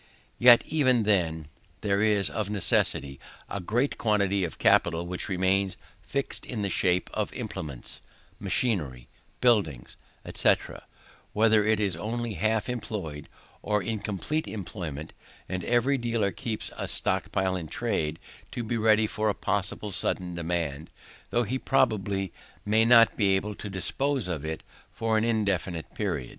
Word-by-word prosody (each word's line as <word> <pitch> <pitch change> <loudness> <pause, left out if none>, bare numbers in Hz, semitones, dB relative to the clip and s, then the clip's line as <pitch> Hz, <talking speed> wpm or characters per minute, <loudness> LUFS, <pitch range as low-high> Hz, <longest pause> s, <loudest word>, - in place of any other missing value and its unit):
Yet 120 -1 +8
even 130 -7 +2
then, 85 -7 +1 0.3
there 100 -1 +1
is, 105 -3 +3
of 105 -2 -2
necessity, 70 -8 +2 0.3
a 100 - -4
great 120 +9 -1
quantity 100 -3 +2
of 85 - -4
capital 85 0 +3
which 90 +3 -4
remains 95 +1 +1 0.2
fixed 140 0 -2
in 110 -5 -4
the 100 - -1
shape 90 0 +2
of - - -1
implements, 70 -6 -6 0.4
machinery, 75 - -1 0.3
buildings, 100 - +1 0.4
&c, - - +5 0.8
whether 110 0 +4
it 110 0 +2
is 100 -3 0
only 120 +1 -3
half 110 +4 0
employed, 100 - -5 0.3
or 105 -2 0
in 110 +3 -2
complete 105 - -2
employment: 85 -7 -6 0.3
and 90 -1 -3
every 125 +3 +2
dealer 115 -4 0
keeps 110 +4 -5
a - - -3
stock - - 0
in 95 -3 0
trade, 80 -8 -2 0.4
to 120 - -3
be 115 +1 -2
ready 110 0 +4
for 110 0 -1
a 105 - 0
possible 105 0 -1
sudden 90 -1 -1
demand, 85 -3 -3 0.4
though 120 - +2
he 130 +4 -2
probably 100 -9 +1 0.3
may 110 +2 +3
not 115 -1 +6
be 100 -3 +3
able 105 +2 -2
to 105 - -7
dispose 130 +5 -1
of 85 -5 -3
it 80 0 -4 0.3
for 115 0 -1
an 110 - +2
indefinite 100 -7 -1
period. 85 - -3
100 Hz, 145 wpm, -27 LUFS, 90-110 Hz, 0.8 s, Yet